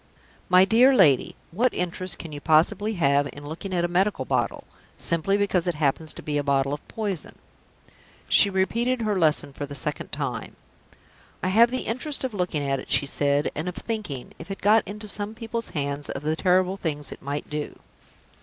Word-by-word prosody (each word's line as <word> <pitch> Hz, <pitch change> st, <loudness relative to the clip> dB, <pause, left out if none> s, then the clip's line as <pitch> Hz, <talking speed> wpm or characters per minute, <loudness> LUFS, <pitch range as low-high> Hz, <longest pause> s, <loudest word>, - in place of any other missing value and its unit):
My 185 Hz, +1 st, +7 dB
dear 245 Hz, +6 st, +5 dB
lady, 150 Hz, -, +4 dB, 0.2 s
what 240 Hz, +8 st, +1 dB
interest 180 Hz, +1 st, -3 dB
can 165 Hz, -, -8 dB
you 145 Hz, -1 st, -7 dB
possibly 185 Hz, +8 st, +3 dB
have 145 Hz, -5 st, +2 dB
in 145 Hz, 0 st, -10 dB
looking 165 Hz, +6 st, -6 dB
at 175 Hz, -1 st, +1 dB
a -, -, +1 dB
medical 190 Hz, +4 st, +1 dB
bottle, -, -, -1 dB, 0.3 s
simply 170 Hz, +4 st, +1 dB
because 195 Hz, -4 st, +1 dB
it 175 Hz, -, 0 dB
happens 150 Hz, +1 st, +1 dB
to -, -, -10 dB
be 145 Hz, -1 st, -1 dB
a -, -, -1 dB
bottle 140 Hz, 0 st, +1 dB
of 145 Hz, -, -7 dB
poison?" 205 Hz, -7 st, -4 dB, 0.9 s
She 200 Hz, -, +6 dB
repeated 230 Hz, +6 st, 0 dB
her 210 Hz, -3 st, 0 dB
lesson 150 Hz, -3 st, +2 dB
for 145 Hz, +1 st, -5 dB
the 140 Hz, -, -8 dB
second 135 Hz, -, -3 dB
time. -, -, -3 dB, 0.9 s
"I 185 Hz, -, +1 dB
have 230 Hz, +5 st, +6 dB
the 255 Hz, +1 st, -2 dB
interest 265 Hz, +6 st, -2 dB
of 260 Hz, -3 st, -2 dB
looking 180 Hz, -6 st, -1 dB
at 135 Hz, -1 st, 0 dB
it," -, -, -10 dB
she -, -, +3 dB
said, 140 Hz, +1 st, +1 dB
"and 160 Hz, +4 st, -3 dB
of 180 Hz, -, -8 dB
thinking, 205 Hz, -, -5 dB
if 165 Hz, -, -10 dB
it 195 Hz, -, -5 dB
got 215 Hz, +2 st, +5 dB
into 210 Hz, +2 st, -7 dB
some 205 Hz, +2 st, -3 dB
people's 230 Hz, 0 st, -4 dB
hands, 145 Hz, -2 st, -2 dB
of 135 Hz, -, -5 dB
the 155 Hz, +1 st, 0 dB
terrible 185 Hz, +2 st, +2 dB
things 150 Hz, -6 st, -4 dB
it -, -, -9 dB
might 145 Hz, +1 st, -4 dB
do." 150 Hz, 0 st, -5 dB
180 Hz, 195 wpm, -25 LUFS, 145-205 Hz, 0.9 s, My